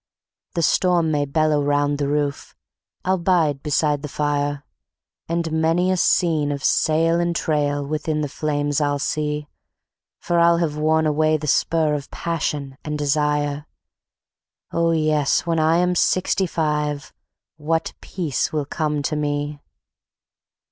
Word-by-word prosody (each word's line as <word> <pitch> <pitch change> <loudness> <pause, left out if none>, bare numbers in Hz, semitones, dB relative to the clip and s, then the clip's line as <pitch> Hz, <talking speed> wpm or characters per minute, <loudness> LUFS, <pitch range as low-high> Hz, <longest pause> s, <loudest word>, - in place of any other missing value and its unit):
The 170 - 0
storm 175 -1 +2
may 145 -1 +1
bellow 155 +1 +1
round 145 0 +1
the 140 - 0
roof, 145 -1 -2 0.5
I'll 190 0 +1
bide 165 -6 +1
beside 150 -1 +1
the 150 - -5
fire, 145 -1 -1 0.7
And 165 -1 -1
many 165 +3 +2
a 185 - +1
scene 160 -5 +2
of 140 -2 -4
sail 165 +2 +2
and 170 0 0
trail 145 -3 0
within 155 +1 -2
the 150 - -1
flame 145 0 -2
I'll 145 -1 +1
see; 150 +1 -2 0.7
For 170 0 0
I'll 170 0 +5
have 165 -3 -1
worn 155 +1 +2
away 155 +1 +2
the 150 - -7
spur 155 +1 +2
of 145 -1 -4
passion 145 -5 -3
and 150 -1 -3
desire.... 150 0 0 1.0
Oh 170 0 +1
yes, 155 -3 +2
when 165 -1 0
I 160 +1 +3
am 180 +1 +2
Sixty 185 +2 +1
five, 150 -3 -2 0.4
what 160 +1 -1
peace 160 -9 -2
will 150 -2 -1
come 150 -1 -2
to 150 - -1
me. 145 0 -2
150 Hz, 140 wpm, -22 LUFS, 145-165 Hz, 1.0 s, I'll